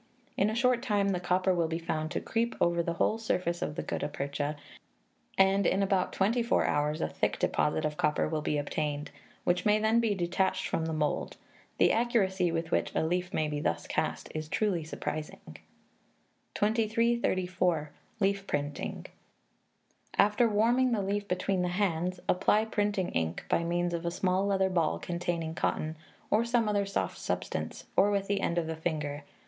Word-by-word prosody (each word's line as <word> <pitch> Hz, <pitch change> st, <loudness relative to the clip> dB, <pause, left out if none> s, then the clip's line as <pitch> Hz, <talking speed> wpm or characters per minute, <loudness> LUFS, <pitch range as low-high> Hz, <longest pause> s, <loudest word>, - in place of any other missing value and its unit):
In 200 Hz, -, +2 dB
a 220 Hz, -, -2 dB
short 245 Hz, 0 st, +3 dB
time 205 Hz, -5 st, +1 dB
the 185 Hz, -2 st, 0 dB
copper 185 Hz, +1 st, +2 dB
will 170 Hz, -2 st, +1 dB
be 160 Hz, 0 st, -2 dB
found 155 Hz, -2 st, -2 dB
to -, -, -2 dB
creep 235 Hz, +1 st, -1 dB
over 170 Hz, 0 st, +3 dB
the 170 Hz, 0 st, -2 dB
whole 215 Hz, +6 st, +1 dB
surface 180 Hz, -6 st, -1 dB
of 150 Hz, -, -2 dB
the -, -, -3 dB
gutta -, -, -2 dB
percha, 145 Hz, +1 st, -3 dB, 0.8 s
and 195 Hz, +1 st, +4 dB
in 195 Hz, +1 st, +2 dB
about 190 Hz, -2 st, +1 dB
twenty 220 Hz, +6 st, +1 dB
four 235 Hz, -, +2 dB
hours 150 Hz, +1 st, 0 dB
a -, -, +1 dB
thick -, -, -1 dB
deposit 80 Hz, -, +1 dB
of 150 Hz, 0 st, -2 dB
copper 150 Hz, -, +1 dB
will 155 Hz, -1 st, -2 dB
be 150 Hz, -, 0 dB
obtained, 145 Hz, 0 st, -2 dB, 0.3 s
which 175 Hz, 0 st, +1 dB
may 210 Hz, 0 st, +4 dB
then 220 Hz, +2 st, +3 dB
be 225 Hz, -3 st, +1 dB
detached 185 Hz, +1 st, 0 dB
from 160 Hz, -, -1 dB
the -, -, -2 dB
mould. 150 Hz, -2 st, -1 dB, 0.4 s
The -, -, +5 dB
accuracy 195 Hz, -7 st, +2 dB
with 165 Hz, 0 st, -2 dB
which -, -, +1 dB
a -, -, +2 dB
leaf 180 Hz, +2 st, -1 dB
may 155 Hz, -, 0 dB
thus 115 Hz, -, -1 dB
be -, -, -7 dB
cast -, -, -1 dB
is 155 Hz, -1 st, -4 dB
truly 190 Hz, -5 st, 0 dB
surprising. 155 Hz, 0 st, -6 dB, 1.0 s
2334. 205 Hz, -7 st, +1 dB, 0.3 s
Leaf 200 Hz, -1 st, +1 dB
Printing. 145 Hz, 0 st, -3 dB, 1.1 s
After 210 Hz, +3 st, +4 dB
warming 240 Hz, +4 st, +3 dB
the 205 Hz, -3 st, 0 dB
leaf 200 Hz, +1 st, -1 dB
between 185 Hz, 0 st, 0 dB
the 180 Hz, -, +1 dB
hands 180 Hz, -1 st, 0 dB
apply 210 Hz, +4 st, +3 dB
printing 205 Hz, -4 st, 0 dB
ink, 80 Hz, 0 st, -2 dB
by 170 Hz, -, +1 dB
means 175 Hz, +1 st, 0 dB
of 170 Hz, 0 st, -2 dB
a -, -, +3 dB
small 185 Hz, +2 st, 0 dB
leather 190 Hz, -1 st, +2 dB
ball 170 Hz, -3 st, +1 dB
containing 170 Hz, -2 st, -3 dB
cotton, 160 Hz, -1 st, -1 dB, 0.4 s
or 215 Hz, +2 st, +4 dB
some 235 Hz, -1 st, +2 dB, 0.2 s
soft 195 Hz, -, -2 dB
substance, -, -, -3 dB
or 200 Hz, +2 st, +5 dB
with 200 Hz, -1 st, 0 dB
the 200 Hz, 0 st, 0 dB
end 170 Hz, -, 0 dB
of 170 Hz, -, +1 dB
the 160 Hz, 0 st, -3 dB
finger. 150 Hz, -3 st, -3 dB
180 Hz, 175 wpm, -30 LUFS, 160-205 Hz, 1.1 s, The